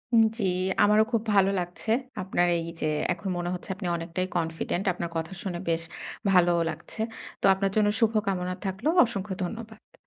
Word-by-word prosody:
উম 225 - +7
জি। 215 - -2 0.4
আমারও 210 +1 +5
খুব 230 - +2
ভালো 195 0 +5
লাগছে। 175 +5 -4 0.3
আপনার 180 -1 +1
এইযে 165 -1 -4 0.3
এখন 185 +3 -5
মনে 175 0 -2
হচ্ছে 180 - -6
আপনি 185 -2 -5
অনেকটাই 170 +2 -2
কনফিডেন্ট। 165 +2 -2
আপনার 170 -1 -4
কথা 160 +2 -3
শুনে 180 -4 -3
বেশ 165 0 +1 0.5
ভালোও 175 -2 +4
লাগছে। 160 +7 -8 0.4
তো - - +1
আপনার 195 0 0
জন্য 215 -1 +4
শুভ 225 -1 +4 0.2
কামনা 180 -2 -1
থাকলো। 190 +9 -1 0.2
অসংখ্য 205 -4 -4
ধন্যবাদ। 220 +3 -7
185 Hz, 165 wpm, -27 LUFS, 175-205 Hz, 0.5 s, উম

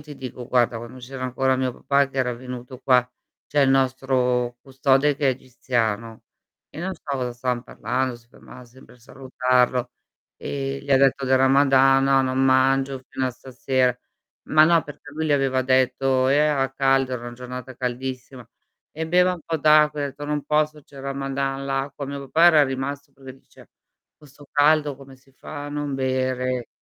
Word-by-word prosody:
ti 150 -1 -11
dico 125 -1 -8
guarda, 120 -2 +2
quando 120 +2 -10
c'era 130 +1 -8
ancora 130 +1 0
mio 130 -1 -1
papà 140 +2 +1
che 135 - -6
era 125 -1 0
venuto 125 +1 -9
qua 125 -1 +3 0.4
c'è 145 - 0
il 135 -1 +4
nostro 130 -2 +1
custode 135 +2 +1
che 145 -3 +1
è - - +5
egiziano 115 -3 -3 0.5
e 160 - -9
non 190 +2 -3
so - - -23
cosa 130 -4 -3
stavam 120 0 -3
parlando, 130 0 -3
si 115 - -22
ferma 125 +1 -15
sempre 125 +2 -18
a - - -26
salutarlo, 125 -1 0 0.5
ehm, 135 0 -4
gli 140 - -9
ha 135 - +6
detto 135 0 +2
del 130 0 +3
Ramadan: 135 0 +4
"No 135 0 +4
non 130 0 -1
mangio 135 0 +2
fino 130 - -2
a 130 - -2
stasera." 130 0 -1 0.5
Ma 155 0 +6
no 165 0 +4
perché 145 0 -12
lui 160 +2 -3
gli 150 - +2
aveva 135 -2 +1
detto 130 0 +2
era 140 -2 +2
caldo, 135 -1 +1
era 125 -2 -4
una 120 - -7
giornata 125 +1 -8
caldissima: 125 0 -5 0.5
"E 160 +1 -5
beva 180 +2 +3
un 175 - -11
po' 165 - -2
d'acqua," 150 -1 +4
ha - - 0
detto: 140 +2 -8
"Non 150 -1 -2
posso 150 0 0
c'è 140 - -19
il 135 - -9
ramadan, 135 0 -3
l'acqua" 135 +1 -3
Mio 140 0 -5
papà 155 +5 +2
era 155 -4 +6
rimasto 140 +2 -5
perché 135 -1 -12
dice: - - -20 0.5
"Con 150 - -17
'sto 145 0 -18
caldo 145 -1 +3
come 135 0 -14
si 135 +1 -27
fa 145 +2 -8
a - - -6
non 145 -1 -4
bere?" 130 -1 -1
135 Hz, 185 wpm, -23 LUFS, 130-140 Hz, 0.5 s, ha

